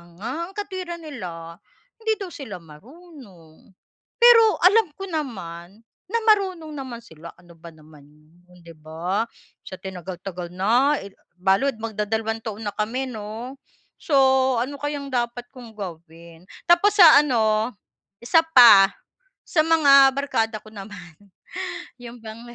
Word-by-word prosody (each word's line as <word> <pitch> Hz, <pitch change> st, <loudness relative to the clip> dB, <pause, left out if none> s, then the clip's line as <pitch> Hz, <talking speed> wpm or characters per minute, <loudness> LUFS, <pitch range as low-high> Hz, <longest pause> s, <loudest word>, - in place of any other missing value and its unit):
nga, 225 Hz, +7 st, -6 dB, 0.2 s
ang 385 Hz, -, -15 dB
katwiran 370 Hz, -4 st, -6 dB
nila, 170 Hz, -, -9 dB, 0.4 s
hindi 445 Hz, -1 st, 0 dB
daw 390 Hz, -4 st, -8 dB
sila 265 Hz, -, -8 dB
marunong. 195 Hz, -, -17 dB, 0.5 s
Pero 475 Hz, -1 st, +8 dB, 0.2 s
alam 415 Hz, +2 st, +5 dB
ko 390 Hz, -, -9 dB
naman 200 Hz, -, -7 dB, 0.2 s
na 465 Hz, +4 st, -1 dB
marunong 380 Hz, -7 st, +1 dB
naman 260 Hz, -5 st, -8 dB
sila, 165 Hz, -4 st, -13 dB
ano 175 Hz, 0 st, -20 dB
ba 170 Hz, -, -13 dB
naman 155 Hz, -2 st, -18 dB, 0.4 s
'yon, 180 Hz, -1 st, -20 dB
'di 165 Hz, -, -13 dB
ba? 170 Hz, +8 st, -3 dB, 0.4 s
Sa 185 Hz, -, -7 dB
tinagal-tagal 180 Hz, -1 st, -7 dB
na 245 Hz, +10 st, +2 dB
eh, 200 Hz, -, -11 dB, 0.2 s
balud 195 Hz, +9 st, +1 dB
magdadalawang 220 Hz, +1 st, -3 dB
taon 220 Hz, 0 st, -6 dB
na -, -, -2 dB
kami, 250 Hz, +5 st, -3 dB
'no? 225 Hz, +5 st, -8 dB, 0.4 s
So, 310 Hz, -7 st, -2 dB, 0.5 s
ano 280 Hz, +2 st, -5 dB
kayang 290 Hz, -2 st, -5 dB
dapat 240 Hz, 0 st, -2 dB
kong 240 Hz, -3 st, -13 dB
gawin? 170 Hz, -2 st, -11 dB, 0.2 s
Tapos 395 Hz, +4 st, +4 dB
sa 335 Hz, -7 st, +8 dB
ano, 225 Hz, -4 st, +1 dB, 0.5 s
1 325 Hz, +7 st, +4 dB, 0.2 s
pa, 205 Hz, -6 st, +9 dB, 0.6 s
sa 310 Hz, -2 st, +2 dB
mga 280 Hz, -4 st, +6 dB
barkada 225 Hz, -6 st, -2 dB
ko 215 Hz, -, -17 dB
naman, 195 Hz, -5 st, -11 dB, 0.9 s
yun 240 Hz, 0 st, -10 dB
bang, 220 Hz, +1 st, -9 dB
225 Hz, 135 wpm, -22 LUFS, 185-290 Hz, 0.9 s, pa